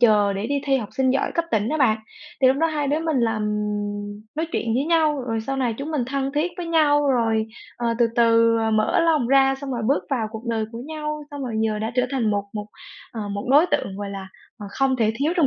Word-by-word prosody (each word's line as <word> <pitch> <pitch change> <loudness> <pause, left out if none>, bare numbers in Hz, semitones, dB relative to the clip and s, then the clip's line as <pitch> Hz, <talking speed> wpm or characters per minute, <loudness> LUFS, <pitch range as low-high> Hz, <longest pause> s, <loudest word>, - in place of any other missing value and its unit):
chờ 210 -4 +4
để 200 +2 -3
đi 285 +2 -1
thi 275 -1 +2
học 225 -6 -4
sinh 265 -1 +3
giỏi 270 - 0
cấp 335 - +1
tỉnh 215 -3 +1
đó 310 - 0
bạn, 225 -6 +3 0.4
thì 260 - +6
lúc 260 - +3
đó 325 +3 +2
hai 300 -3 -1
đứa 295 +3 +1
mình 320 -3 -1
là, 225 -1 +1
ừm, 210 -1 -3
nói 320 +2 -1
chuyện 225 -1 -1
với 265 +3 +1
nhau, 310 -3 +2
rồi 225 -2 -2
sau 270 +5 -3
này 250 -4 0
chúng 285 +3 -4
mình 295 -6 0
thân 270 +1 -2
thiết 320 +5 0
với 355 -2 -5
nhau, 295 -3 +3
rồi, 225 -3 +1 0.3
ờ, 235 -1 -1
từ 240 - +5
từ 230 -1 +4 0.2
mở 215 +8 +2
lòng 320 -6 +2
ra 270 0 +5
xong 280 -1 -5
rồi 240 -2 -3
bước 280 - +1
vào 235 -5 0
cuộc 220 +1 -8
đời 225 -2 0
của 230 - -6
nhau, 300 -1 -4
xong 285 -1 -6
rồi 245 -4 -4
giờ 220 -1 0
đã 220 +2 -3
trở 250 0 +2
thành 250 -6 0
một 205 -1 0
một, 210 -1 -5 0.5
ờ, 215 -3 -5
một 200 0 -4
đối 295 +5 +6
tượng, 195 - -1
gọi 200 0 -5
là, 195 -1 -7 0.3
à, 205 - -7
không 270 +2 +1
thể 220 -3 +2
thiếu 295 +6 +1
trong 325 -5 +4
245 Hz, 255 wpm, -23 LUFS, 220-290 Hz, 0.5 s, thì